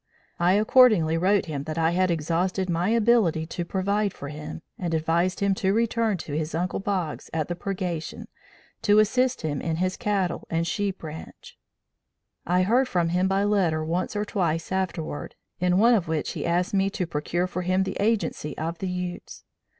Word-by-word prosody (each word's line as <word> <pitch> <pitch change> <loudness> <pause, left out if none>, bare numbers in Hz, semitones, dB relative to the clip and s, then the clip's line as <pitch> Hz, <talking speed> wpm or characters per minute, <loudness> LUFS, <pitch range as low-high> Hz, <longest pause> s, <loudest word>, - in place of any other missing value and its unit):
I 175 +2 +4
accordingly 210 -6 +5
wrote 195 +4 +2
him 145 -4 -4
that 155 +1 -5
I 165 0 +2
had 185 +1 +2
exhausted 175 +3 0
my 175 +4 +1
ability 220 -8 +3
to 175 +2 -4
provide 200 +3 0
for 140 - -7
him, 150 +2 -7 0.2
and 170 -3 -1
advised 170 +4 0
him 200 0 +3
to 190 +1 +2
return 230 -2 +1
to 145 - -6
his 155 +1 -2
uncle 180 +2 -1
Boggs 190 -6 -3
on 155 -2 0
the 175 - -2
Purgation 180 -3 -4 0.5
to 205 0 +4
assist 250 +4 +3
him 145 -3 -2
in 165 -1 -1
his 185 +2 -1
cattle 195 -4 -1
and 165 0 0
sheep 195 +2 -2
ranche. 160 0 -9 0.9
"I 180 +2 +3
heard 245 +7 +3
from 175 -7 +1
him 180 +2 +2
by 195 +1 +1
letter 180 -7 +1
once 175 +5 -2
or 210 0 0
twice 170 -6 -1
afterward, 180 -5 -3 0.2
in 180 0 +2
one 230 +4 +6
of 195 -8 +1
which 160 -1 -1
he - - -4
asked 175 +3 0
me 195 0 +2
to 190 -2 -2
procure 165 +3 -1
for 180 0 -4
him 185 +1 +1
the 190 0 -4
agency 200 -8 0
for 165 +2 -2
the 190 - -3
Utes. 180 -1 -5
180 Hz, 185 wpm, -25 LUFS, 165-200 Hz, 0.9 s, one